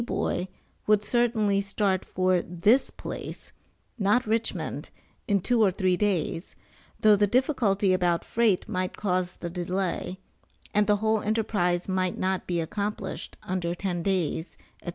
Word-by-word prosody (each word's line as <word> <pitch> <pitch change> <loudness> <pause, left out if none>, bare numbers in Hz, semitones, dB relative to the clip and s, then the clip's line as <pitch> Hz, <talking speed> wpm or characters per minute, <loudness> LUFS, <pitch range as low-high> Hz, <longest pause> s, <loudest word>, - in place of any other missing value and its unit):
Boy" 190 -5 -1 0.4
would 210 -1 +4
certainly 220 -3 +2
start 195 -1 0
for 185 -1 +1
this 190 +11 +2
place - - -7 0.5
(not 210 +5 +3
Richmond) 225 +1 -1 0.4
in 200 -3 +3
two 240 +4 +2
or 210 - +6
three 185 0 +1
days, 180 -3 -1 0.5
though 215 -1 +7
the 205 0 +3
difficulty 210 -6 +2
about 175 -2 +1
freight 225 -5 +1
might 185 0 -2
cause 185 -3 -1
delay, 180 +1 -3 0.6
and 210 0 +3
the 210 - +4
whole 220 -1 +2
enterprise 205 -5 0
might 185 -1 0
not 190 0 -1
be 175 -1 0
accomplished 200 +4 -4
under 175 -2 -2
ten 180 -2 -2
days, 180 -3 -1 0.3
&c. - - -5
195 Hz, 135 wpm, -27 LUFS, 180-210 Hz, 0.6 s, though